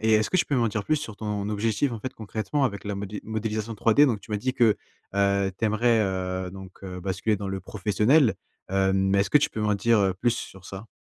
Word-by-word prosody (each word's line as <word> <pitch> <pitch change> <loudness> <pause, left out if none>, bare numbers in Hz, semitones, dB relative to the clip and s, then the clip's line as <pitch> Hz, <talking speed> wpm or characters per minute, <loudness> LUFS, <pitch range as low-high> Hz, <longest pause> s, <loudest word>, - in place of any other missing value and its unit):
et 110 0 +2
est-ce 110 0 +3
que - - +1
tu - - +3
peux 145 - -2
m'en 120 -2 +2
dire 105 -1 -3
plus 155 - +2
sur 115 -8 -6
ton 105 -1 -3
objectif, 110 +5 0
en 115 - -4
fait, 130 +5 -5
concrètement, 110 +6 -2
avec 100 -6 -2
la 105 0 -3
modé 100 +1 -5
modélisation 110 0 -3
3D? 115 +6 +4
Donc, 115 -7 +1
tu 100 - -16
m'as 105 - 0
dit 130 +5 -1
que, 120 -5 +3 0.4
heu, 100 -1 +2
tu - - -1
aimerais, 110 +2 +3
heu, 95 -2 -2
donc, 95 0 -12
heu, 90 -1 -6
basculer 95 +3 -1
dans 100 0 -5
le 95 0 -3
professionnel. 110 - +2 0.4
Heu, 95 0 +2
mais 95 +1 +2
est-ce 100 - 0
que 150 - +7
tu 150 +1 +1
peux 110 - -5
m'en 105 -1 +2
dire 100 -1 +3
plus 120 - +2
sur 95 0 -8
ça? 95 +3 -8
105 Hz, 245 wpm, -26 LUFS, 95-115 Hz, 0.4 s, que